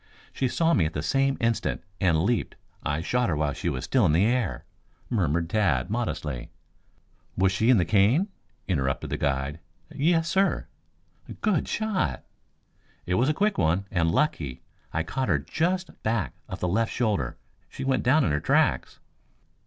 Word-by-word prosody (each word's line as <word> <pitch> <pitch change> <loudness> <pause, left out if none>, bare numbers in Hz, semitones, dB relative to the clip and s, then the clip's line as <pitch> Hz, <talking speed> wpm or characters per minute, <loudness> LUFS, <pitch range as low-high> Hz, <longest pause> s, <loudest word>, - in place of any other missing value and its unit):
She 130 - 0
saw 165 +6 +2
me 85 - +3
at 80 - -7
the 75 - -3
same 135 +7 +1
instant, 115 -1 0 0.2
and 85 -4 +2
leaped. 120 +3 0 0.3
I 75 +3 -1
shot 125 +5 0
her 80 - +1
while 75 -2 0
she - - -2
was 65 - -3
still 130 -3 +2
in 75 - +2
the 90 +6 +4
air," 120 -4 0 0.5
murmured 85 - +1
Tad 85 - +1
modestly. 80 - -3 0.9
"Was 95 +1 +3
she 110 +5 +1
in 130 - +7
the 90 - +2
cane?" 110 - +3 0.4
interrupted 65 -8 -1
the - - -1
guide. 70 +2 -1 0.3
"Yes, 165 +3 +2
sir." 195 +3 +1 0.8
"Good 210 -7 +1
shot!" 200 - -1 0.8
"It 90 - -1
was 125 +9 +3
a - - +3
quick 210 +3 +1
one, 85 +3 +2
and 85 -3 +2
lucky. 80 - -1 0.3
I 80 - -1
caught 130 +10 -2
her - - +4
just 180 +3 -2
back 110 - -1 0.2
of - - -6
the 90 - +1
left 110 +6 +1
shoulder. 105 - -1 0.3
She - - -7
went 130 -1 +1
down 140 +5 +4
in 80 - +1
her 75 - +1
tracks." 65 - +1
100 Hz, 170 wpm, -26 LUFS, 80-130 Hz, 0.9 s, in